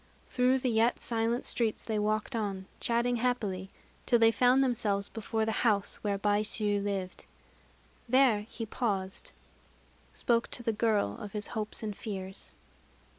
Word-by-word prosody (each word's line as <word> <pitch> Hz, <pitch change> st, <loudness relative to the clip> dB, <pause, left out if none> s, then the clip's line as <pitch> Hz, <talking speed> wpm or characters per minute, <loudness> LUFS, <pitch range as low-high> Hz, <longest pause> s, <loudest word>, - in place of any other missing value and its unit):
Through 255 Hz, +1 st, +3 dB
the 255 Hz, -1 st, 0 dB
yet 225 Hz, +2 st, +3 dB
silent 230 Hz, +1 st, 0 dB
streets 225 Hz, -3 st, 0 dB
they 220 Hz, -2 st, -1 dB
walked 215 Hz, +3 st, -1 dB
on, 200 Hz, -4 st, -2 dB
chatting 240 Hz, +1 st, +1 dB
happily, 215 Hz, -6 st, -1 dB, 0.4 s
till 240 Hz, -, +5 dB
they 225 Hz, 0 st, +6 dB
found 250 Hz, +3 st, +4 dB
themselves 210 Hz, -6 st, 0 dB
before 225 Hz, 0 st, -2 dB
the 220 Hz, -, 0 dB
house 210 Hz, -4 st, +1 dB
where 200 Hz, -2 st, -1 dB
Baishû 205 Hz, 0 st, +1 dB
lived. 195 Hz, -2 st, -3 dB, 0.8 s
There 255 Hz, -4 st, +5 dB
he 225 Hz, -, -5 dB
paused 200 Hz, -4 st, -2 dB, 0.8 s
spoke 235 Hz, -2 st, +1 dB
to 240 Hz, -, -3 dB
the 225 Hz, -, 0 dB
girl 210 Hz, -, +1 dB
of 205 Hz, -, -8 dB
his 210 Hz, -1 st, -2 dB
hopes 215 Hz, 0 st, -4 dB
and 210 Hz, -2 st, -3 dB
fears. 190 Hz, -3 st, -6 dB
220 Hz, 145 wpm, -30 LUFS, 205-235 Hz, 0.8 s, they